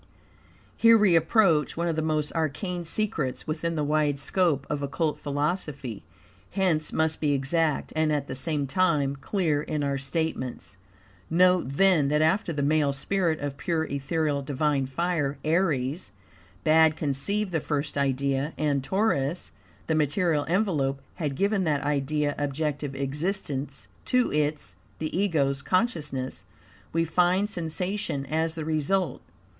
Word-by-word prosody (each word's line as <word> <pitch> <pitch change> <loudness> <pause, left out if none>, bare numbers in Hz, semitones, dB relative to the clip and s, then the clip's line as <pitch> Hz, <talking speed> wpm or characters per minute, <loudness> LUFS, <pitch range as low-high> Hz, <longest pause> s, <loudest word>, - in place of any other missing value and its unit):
Here 230 0 +6
we 200 -5 +4
approach 165 -2 +3
one 170 +1 0
of 165 - 0
the 160 - 0
most 155 -1 -1
arcane 170 +3 -2
secrets 165 -8 -1
within 165 +2 -2
the 150 - 0
wide 150 -1 +1
scope 145 -1 +1
of 150 -1 -2
Occult 150 +2 -1
philosophy, 145 - -3 0.5
hence 180 -5 0
must 160 0 0
be 150 -2 +2
exact, 150 +3 0
and 155 -1 +2
at 145 -2 0
the - - -4
same 145 +2 -1
time 145 -3 +1
clear, 150 +1 0
in 150 -1 -2
our 140 -1 -1
statements. 140 -2 -3 0.5
Note, 180 +2 +4
then, 160 0 +3
that 150 +2 +2
after 170 +4 +2
the 145 -3 -2
male 145 -1 +2
spirit 165 +2 0
of 145 -1 -4
pure, 160 +2 -1
ethereal, 145 0 -1
divine 140 0 0
fire 145 -1 -1
(Aries) 155 -2 0 0.5
bad 160 0 +5
conceived 185 +8 -1
the 165 - +1
first 145 0 -2
idea, 140 +1 0
and 145 -3 0
Taurus, 175 -3 0 0.3
the 160 - 0
material 155 0 +1
envelope, 160 -8 +1 0.2
had 150 -6 -2
given 200 +4 +1
that 145 -3 0
idea 145 +1 0
objective 145 0 -2
existence 140 -1 -3 0.2
to 250 -1 +2
its 150 0 -1 0.2
(the 155 0 -4
Ego's) 150 -8 +1
consciousness, 150 - -1 0.5
we 165 0 +1
find 180 +5 +2
SENSATION 175 -4 -2
AS 160 +3 -1
THE 160 -2 -4
RESULT. 160 +1 0
155 Hz, 140 wpm, -26 LUFS, 140-170 Hz, 0.5 s, Here